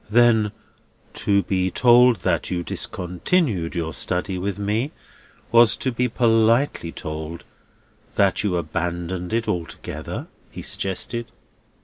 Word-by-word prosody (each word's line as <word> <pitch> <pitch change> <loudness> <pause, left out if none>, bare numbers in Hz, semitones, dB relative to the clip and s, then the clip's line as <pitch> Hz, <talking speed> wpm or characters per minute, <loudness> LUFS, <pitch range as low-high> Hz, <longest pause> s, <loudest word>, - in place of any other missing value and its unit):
"Then, 110 -2 +4 0.6
to 100 -1 +1
be 95 -1 0
told 120 -1 +5
that 90 -2 0
you 90 -1 -2
discontinued 90 - -1
your 80 -2 -2
study 90 +3 -1
with 100 +1 -2
me, 105 +7 -1 0.6
was 115 -1 +6
to 130 - -2
be 125 +1 0
politely 115 - +2
told 80 +2 -6 0.7
that 100 -2 +3
you 100 -4 0
abandoned 85 +2 -3
it 115 0 0
altogether?" 85 -2 -4 0.2
he - - -9
suggested. 115 +5 -2
100 Hz, 115 wpm, -23 LUFS, 90-115 Hz, 0.7 s, was